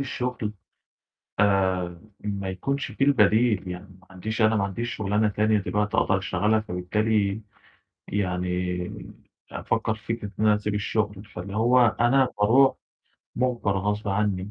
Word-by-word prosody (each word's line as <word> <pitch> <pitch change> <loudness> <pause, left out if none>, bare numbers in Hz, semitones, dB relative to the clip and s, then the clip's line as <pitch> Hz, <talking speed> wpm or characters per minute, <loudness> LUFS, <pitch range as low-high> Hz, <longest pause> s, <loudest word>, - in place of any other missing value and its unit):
الشغل، 125 -5 -3 0.9
آآ 95 -4 +1 0.2
ما 100 -2 -3
يكونش 135 +9 -3
في 115 - -1
البديل، 110 -6 +3
يعني 90 +2 -8
ما 90 - -23
عنديش 110 +5 -4
أنا 110 0 +4
ما 100 - +1
عنديش 115 +5 -3
شغلانة 105 +1 +1
تانية 105 +1 +2
دلوقتي 105 +1 -1
أقدر 95 - +3
أشتغلها. 100 +3 +1
فبالتالي، 105 +1 0 0.7
يعني 90 -2 -3 0.4
أفكّر 110 - -1
في 110 +1 -4
فكرة 105 -3 -8
إن 110 - +2
أنا 105 -1 +5
أسيب 105 0 -3
الشغل، 105 -1 -1
فاللي 100 -1 -8
هو 120 +1 +4
أنا 130 +3 +4
باروح 125 +6 +5 0.6
مُجبر 120 -6 0
غصب 105 +1 -2
عني. 100 -1 -1
105 Hz, 135 wpm, -25 LUFS, 95-110 Hz, 0.9 s, أنا